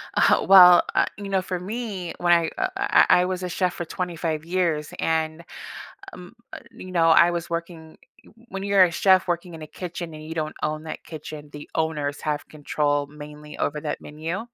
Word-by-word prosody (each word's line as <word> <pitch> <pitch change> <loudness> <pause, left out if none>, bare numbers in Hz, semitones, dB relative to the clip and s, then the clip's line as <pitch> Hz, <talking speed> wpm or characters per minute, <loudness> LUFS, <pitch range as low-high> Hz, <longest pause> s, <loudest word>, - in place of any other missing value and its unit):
Uh, - - +3
well, 180 -2 +9
uh, - - +4
you 200 -1 -7
know, 190 -1 +1
for 185 -1 -4
me, 200 -2 -5
when 175 0 +3
I 170 -1 +2 0.3
I 390 - +4 0.2
I - - +1
was 185 0 -3
a 180 - -3
chef 180 0 -1
for 175 - -5
25 165 -3 -3
years, 170 -4 -1
and 160 0 -1 0.7
mm, 180 +2 -11 0.2
uh, - - -6
you 185 - -11
know, 165 -2 +3
I 170 +1 +6
was 170 -1 -4
working 170 -1 -6 0.3
w - - -19 0.2
when 195 0 -5
you're 200 -1 +5
a 180 - +2
chef 190 +2 +3
working 175 0 -3
in 160 - -9
a 155 - -8
kitchen 175 -1 -7
and 155 0 -10
you 160 - -6
don't 155 -1 -3
own 155 0 -2
that 155 -1 -7
kitchen, 155 -2 -9
the 150 0 -10
owners 150 -3 -2
have 150 -2 -3
control 145 -1 -1
mainly 150 0 -11
over 150 +1 -2
that 155 - -4
menu. 160 +5 -5
165 Hz, 200 wpm, -24 LUFS, 155-180 Hz, 0.7 s, well